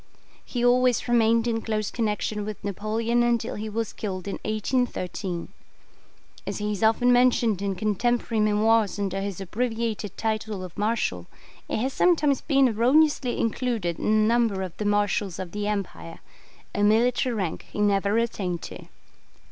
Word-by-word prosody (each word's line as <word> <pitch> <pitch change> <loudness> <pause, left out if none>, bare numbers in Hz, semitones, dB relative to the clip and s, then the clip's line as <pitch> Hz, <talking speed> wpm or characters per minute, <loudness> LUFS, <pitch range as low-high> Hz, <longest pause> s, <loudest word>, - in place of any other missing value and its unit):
He 245 -1 -2
always 250 0 +3
remained 230 -1 +3
in 225 -1 0
close 215 -2 -2
connection 210 -2 -2
with 215 0 -7
Napoleon 220 +4 0
until 240 -1 +1
he 215 +1 -5
was 225 +1 -3
killed 190 -3 -5
in 200 - -4
1813. 210 -5 -2 1.0
As - - -3
he 210 0 -2
is 205 - -4
often 225 +3 +4
mentioned 240 -5 +3
in 200 -1 -1
contemporary 220 +3 0
memoirs 215 0 +2
under 195 -1 -2
his 195 -2 -4
abbreviated 225 0 -3
title 215 -3 -2
of 180 -2 -9
'Marshal', 205 - -1 0.4
he - - -2
has 260 +4 -1
sometimes 305 -6 +3
been 275 -3 +3
erroneously 255 +3 +3
included 225 -7 -1
in - - -4
the 215 0 +3
number 230 -5 +2
of 185 -3 -7
the 210 - -3
Marshals 205 -2 0
of 185 -2 -6
the 205 +1 -3
Empire 200 -5 -4 0.6
a 205 - -1
military 235 +4 +3
rank 190 -6 -3
he - - -6
never 200 0 +2
attained 195 -7 -2
to. - - -9
215 Hz, 155 wpm, -25 LUFS, 200-235 Hz, 1.0 s, often